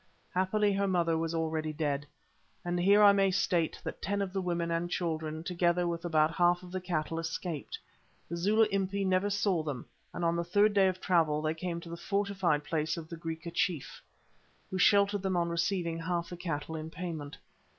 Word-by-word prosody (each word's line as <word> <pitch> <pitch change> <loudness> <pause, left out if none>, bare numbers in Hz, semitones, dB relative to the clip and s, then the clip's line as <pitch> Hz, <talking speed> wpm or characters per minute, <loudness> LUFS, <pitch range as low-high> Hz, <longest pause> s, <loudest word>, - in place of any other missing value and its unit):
Happily 200 +3 +2
her 200 0 +1
mother 170 -3 +2
was 165 0 -1
already 160 -1 -1
dead. 145 -2 -2 0.6
And 175 0 -1
here 200 +4 +5
I 205 - +9
may 195 -1 +3
state 180 -3 +1
that - - -6
ten 200 +1 -1
of 195 -2 -2
the 195 - -1
women 170 -2 -1
and 170 +1 -1
children, 160 -3 -2
together 175 0 +1
with 170 -1 -3
about 160 -2 +2
half 175 0 +3
of 180 - -11
the 185 0 -3
cattle, 165 -2 -2
escaped. 165 - -4 0.5
The 170 - -4
Zulu 205 +6 +3
Impi 195 0 0
never 190 +2 +2
saw 200 -4 +1
them, 145 -5 -5 0.3
and 175 - -3
on 170 0 +2
the 170 - 0
third 205 +5 +3
day 195 -2 +5
of 185 0 -1
travel 160 -5 +2
they 155 0 +1
came 170 +1 -4
to 170 - -10
the 170 - -6
fortified 195 -5 0
place 155 +2 -1
of 160 0 -8
a - - -4
Griqua 165 0 -6
chief, 165 -4 -2 0.7
who 185 - -2
sheltered 200 +1 +4
them 190 -2 0
on 170 0 +1
receiving 170 0 -1
half 170 0 -2
the 175 - -6
cattle 160 -3 -4
in 155 0 -5
payment. 160 -4 -6
175 Hz, 200 wpm, -31 LUFS, 165-190 Hz, 0.7 s, I